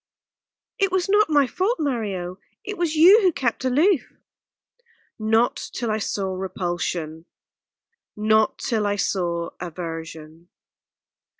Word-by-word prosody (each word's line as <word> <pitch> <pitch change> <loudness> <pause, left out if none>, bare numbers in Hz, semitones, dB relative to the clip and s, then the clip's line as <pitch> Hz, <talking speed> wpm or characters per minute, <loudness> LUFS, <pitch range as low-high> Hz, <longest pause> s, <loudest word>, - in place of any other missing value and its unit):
"It 390 -1 +2
was 375 0 0
not 415 -1 +4
my 290 -2 +4
fault, 380 - -1
Mario. 200 - -3 0.2
It 420 - -5
was 340 -4 -1
you 370 +8 +7
who 370 -3 +4
kept 250 -6 -2
aloof." 295 +6 +2 1.1
"Not 225 +2 +2 0.2
till 235 -3 -2
I 215 - -1
saw 195 -2 -2
repulsion 175 -3 -4 0.9
not 215 +1 +2
till 220 -5 -1
I 205 - 0
saw 170 -4 -1
aversion." 165 -1 -8
215 Hz, 115 wpm, -23 LUFS, -, 1.1 s, you